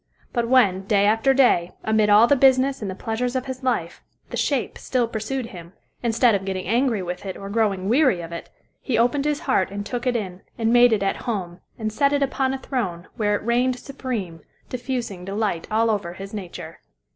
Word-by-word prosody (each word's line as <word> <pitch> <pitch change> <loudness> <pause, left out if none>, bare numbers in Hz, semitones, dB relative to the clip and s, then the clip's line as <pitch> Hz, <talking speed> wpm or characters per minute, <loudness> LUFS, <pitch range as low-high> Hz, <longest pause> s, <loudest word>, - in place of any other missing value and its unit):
But 235 -2 0
when, 195 -7 +3
day 200 -2 +3
after 225 +6 +3
day, 245 -10 +3
amid 220 -1 +2
all 210 +2 +7
the 285 - +4
business 265 0 +3
and 205 - -3
the 190 - -5
pleasures 245 +4 -2
of 260 0 -1
his 260 0 -6
life, 235 -10 -2 0.3
the - - -3
"shape" 275 -5 -1
still 250 -3 0
pursued 230 +4 -3
him, 175 -5 -11 0.3
instead 235 0 +3
of 195 -1 0
getting 190 -1 -3
angry 230 -1 +1
with 180 0 -5
it 190 -2 -5
or 195 0 -7
growing 200 -4 0
weary 250 - +3
of 165 0 -8
it, 170 - -7 0.3
he 245 -5 -1
opened 245 +5 +2
his 300 -1 0
heart 225 -9 +1
and 200 +1 -5
took 245 +3 -3
it 245 - +1
in, 190 -5 -4 0.2
and 225 0 +1
made 245 0 +6
it 210 -3 +1
at 195 - 0
home, 185 -6 -3 0.2
and 215 -2 -3
set 280 +4 +2
it 285 -1 +2
upon 265 -1 0
a 270 - -2
throne, 195 -11 -4
where 210 -2 +1
it 205 - -5
reigned 245 +2 +2
supreme, 240 - -5 0.3
diffusing 245 -7 -4
delight 195 -3 -2
over 215 -4 +1
all 175 - -9
his 195 +2 -9
nature. 190 -5 -7
225 Hz, 210 wpm, -23 LUFS, 195-255 Hz, 0.3 s, all